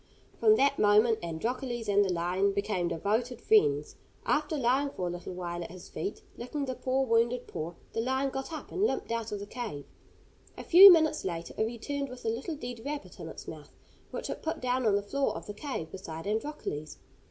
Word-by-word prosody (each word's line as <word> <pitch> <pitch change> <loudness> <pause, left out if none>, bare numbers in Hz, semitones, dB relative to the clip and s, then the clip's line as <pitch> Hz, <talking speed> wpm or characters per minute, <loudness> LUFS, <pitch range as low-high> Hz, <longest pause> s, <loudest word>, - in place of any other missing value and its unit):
From 435 -1 +6
that 280 -6 +2
moment 215 +2 +5
Androcles 230 +8 -3
and 205 0 +4
the 190 - 0
lion 180 +3 +1
became 200 -3 -1
devoted 220 +9 -1
friends. 430 - +3 0.3
After 305 +1 +1
lying 265 +2 +2
for 185 - -4
a - - -2
little 175 +1 -6
while 175 -1 -4
at - - -8
his 185 +1 -11
feet, 415 +2 -5
licking 275 +4 -3
the 260 - -3
poor 260 +1 0
wounded 235 +1 +2
paw, 165 +2 -5 0.2
the 225 - 0
lion 265 +3 0
got 270 +4 -5
up 310 -3 -7
and 375 - -3
limped 430 - 0
out 230 -1 -2
of 210 - -2
the 200 - -6
cave. 210 - -6 0.7
A - - -6
few 380 +3 +11
minutes 315 -3 +3
later 170 -2 -4
it 220 - +1
returned 275 +5 -4
with 250 -1 -10
a - - +2
little 260 +9 -3
dead 245 -5 -7
rabbit 290 +1 -6
in - - -6
its - - -10
mouth, - - -10 0.3
which - - -5
it - - -5
put 320 - -3
down 255 -1 0
on 205 - +4
the 200 - 0
floor 275 +7 -1
of - - -7
the 205 - -6
cave 210 - -5
beside 165 -4 -7
Androcles. 210 - -3
235 Hz, 210 wpm, -30 LUFS, 200-275 Hz, 0.7 s, few